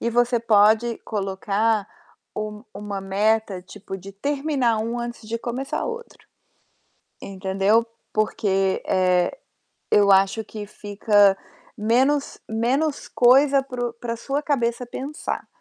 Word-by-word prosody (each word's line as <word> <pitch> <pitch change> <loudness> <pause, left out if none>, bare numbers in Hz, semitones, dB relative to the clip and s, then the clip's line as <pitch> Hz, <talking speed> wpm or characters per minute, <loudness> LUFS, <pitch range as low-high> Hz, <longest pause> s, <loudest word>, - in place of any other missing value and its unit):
E 235 - -1
você 240 +1 +2
pode 220 +1 +3
colocar 205 +1 -1 0.5
um 210 0 -5
uma 200 -1 -5
meta, 200 0 0
tipo, 195 +1 -8
de 195 +1 -11
terminar 270 0 0
um 230 +2 -2
antes 240 -2 -6
de 230 - -2
começar 250 +4 -3
outro. 470 0 -7 0.9
Entendeu? 195 +3 +1 0.3
Porque, 195 -3 0
eh, 180 -1 +2 0.6
eu 200 -1 +5
acho 195 +3 +3
que 210 -1 -8
fica 205 -1 +2 0.4
menos 260 +7 +1
menos 265 +7 0
coisa 270 +3 +5
para 250 -2 -4
o - - -11
para 235 0 -5
sua 275 +5 -2
cabeça 250 -5 0
pensar, 275 +5 -5
220 Hz, 120 wpm, -23 LUFS, 200-245 Hz, 0.9 s, eu